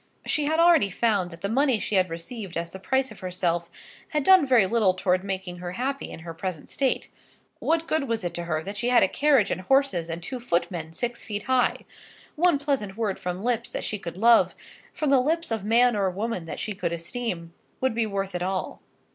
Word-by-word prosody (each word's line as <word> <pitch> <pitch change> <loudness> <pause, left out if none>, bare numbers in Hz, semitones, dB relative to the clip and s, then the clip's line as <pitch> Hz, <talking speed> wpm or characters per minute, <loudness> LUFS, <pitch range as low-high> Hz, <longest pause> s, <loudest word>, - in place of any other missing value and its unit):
She 300 - +1
had 315 +2 +1
already 335 -10 +5
found 200 -2 +1
that 165 -1 -12
the - - +1
money 260 +3 +2
she 215 - -4
had 185 -2 +3
received 180 +3 -6
as 170 0 -3
the 190 - -8
price 265 +5 0
of 215 - -12
herself 175 -2 -1 0.4
had 300 -2 -1
done 375 -3 +6
very 245 -6 +5
little 200 -3 +2
towards 185 0 +1
making 190 -2 -4
her 175 0 -5
happy 270 +6 -3
in - - -9
her 165 0 -7
present 170 -2 -6
state. 270 -2 0 0.5
What 330 0 +1
good 310 -3 0
was 230 -3 -1
it 175 - -3
to 175 - -4
her 155 -2 -1
that 200 +3 -6
she 240 +3 0
had 245 -4 +5
a - - +5
carriage 275 -2 +3
and - - -2
horses 265 -7 +2
and 165 +1 -5
two 255 +5 -4
footmen 170 -7 -2
six 240 +6 -4
feet 205 -2 -4
high? 255 -1 +1 0.5
One 345 -1 +3
pleasant 270 -9 -2
word 215 -4 -1
from 180 +2 -4
lips 240 0 0
that - - -3
she 210 - -3
could 170 -2 -7
love, 230 +3 +5 0.4
from 300 -3 -1
the 275 - +6
lips 325 +2 -1
of 220 -3 -1
man 235 +3 +4
or 195 -2 +1
woman 200 -1 -3
that 165 - -6
she 215 - -3
could 180 -3 -3
esteem, 170 -1 -4 0.3
would 260 -2 +1
be 225 -1 0
worth 195 -1 -3
it 180 - -3
all. 185 +1 -3
210 Hz, 225 wpm, -26 LUFS, 180-255 Hz, 0.5 s, done